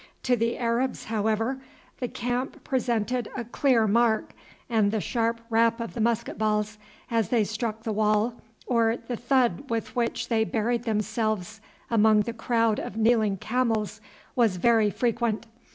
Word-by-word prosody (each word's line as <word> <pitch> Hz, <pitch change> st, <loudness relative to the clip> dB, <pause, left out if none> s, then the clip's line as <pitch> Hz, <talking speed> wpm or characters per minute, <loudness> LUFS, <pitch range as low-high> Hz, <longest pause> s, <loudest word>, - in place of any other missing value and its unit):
To 250 Hz, -, +3 dB
the 230 Hz, 0 st, 0 dB
Arabs, 245 Hz, +2 st, -1 dB
however, 220 Hz, +4 st, -1 dB, 0.4 s
the 250 Hz, -, -1 dB
camp 245 Hz, +3 st, -3 dB
presented 245 Hz, -3 st, -1 dB
a 240 Hz, -, -2 dB
clear 240 Hz, 0 st, +2 dB
mark, 225 Hz, +1 st, +2 dB, 0.3 s
and 220 Hz, -4 st, +2 dB
the 220 Hz, -, 0 dB
sharp 230 Hz, +1 st, -1 dB
rap 230 Hz, +1 st, +3 dB
of 230 Hz, -, -5 dB
the -, -, -6 dB
musketballs 215 Hz, -2 st, 0 dB, 0.3 s
as 225 Hz, -4 st, +1 dB
they 235 Hz, -3 st, +3 dB
struck 220 Hz, +1 st, -3 dB
the 225 Hz, -, -2 dB
wall, 215 Hz, +2 st, +1 dB, 0.2 s
or 230 Hz, -1 st, +2 dB
the 245 Hz, -, -5 dB
thud 245 Hz, -1 st, +1 dB
with 230 Hz, -1 st, -3 dB
which 235 Hz, -1 st, -1 dB
they 225 Hz, -2 st, +2 dB
buried 235 Hz, +2 st, -1 dB
themselves 215 Hz, -2 st, -1 dB, 0.3 s
among 215 Hz, -1 st, +5 dB
the 230 Hz, +2 st, -3 dB
crowd 230 Hz, -1 st, +1 dB
of 210 Hz, -, -6 dB
kneeling 220 Hz, -3 st, +3 dB
camels, 220 Hz, -1 st, -1 dB, 0.3 s
was 230 Hz, -6 st, +3 dB
very 225 Hz, +1 st, +4 dB
frequent. 235 Hz, 0 st, -1 dB
230 Hz, 150 wpm, -26 LUFS, 215-240 Hz, 0.4 s, among